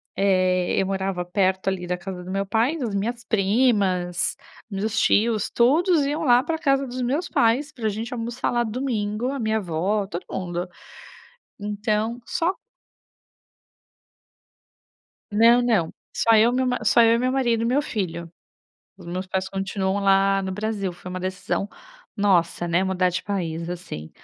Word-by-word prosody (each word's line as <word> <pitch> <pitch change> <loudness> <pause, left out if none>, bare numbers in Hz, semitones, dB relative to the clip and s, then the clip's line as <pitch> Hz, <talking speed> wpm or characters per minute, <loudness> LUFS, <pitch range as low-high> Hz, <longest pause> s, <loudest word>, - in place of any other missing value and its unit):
eh, 185 -2 +2
eu 190 - +2
morava 190 -2 -2
perto 190 +1 0
ali 180 -2 -3
da 180 0 -1
casa 180 0 -7
do 185 - -7
meu 195 0 -1
pai, 225 +10 +1
das 240 -8 -3
minhas 235 +4 -2
primas, 195 -5 +1 0.3
dos 215 +2 -1
tios. 220 0 +2
Todos 305 +6 +3
iam 295 +3 -2
lá 245 -3 +5
pra 320 +2 -2
casa 275 -2 +2
dos 255 +1 -5
meus 280 +8 -1
pais 255 +7 +2
pra 230 -7 -2
gente 225 +4 -5
almoçar 235 +1 -2
lá 240 0 +1
domingo. 225 -1 -2
A 280 - -4
minha 220 -1 0
avó, 195 +2 -1
todo 180 -2 -6
mundo. 175 -1 -3 0.9
Então 210 +3 -1
só 345 +3 0 2.8
Não, 230 +3 +5
não. 215 -10 +1 0.2
Só 230 - +4
eu, 225 +2 +5
meu 255 +1 +1
ma 250 -3 -1
só 235 +2 +5
eu 230 0 +5
e - - +2
meu 255 +2 0
marido 240 -4 +1
e - - 0
meu 265 +5 +2
filho. 170 - -4 0.7
Os 180 -3 -14
meus 185 +2 -4
pais 190 0 -2
continuam 195 0 -2
lá 195 0 +3
no 190 0 -3
Brasil. 210 -2 -2
Foi 175 +1 -11
uma 185 0 -5
decisão 185 +2 -3 0.5
nossa, 175 -4 +2
né, 175 +3 +2
mudar 185 -1 +1
de 180 - -3
país, 170 -5 -3
assim. 170 - -7
205 Hz, 160 wpm, -23 LUFS, 185-235 Hz, 2.8 s, lá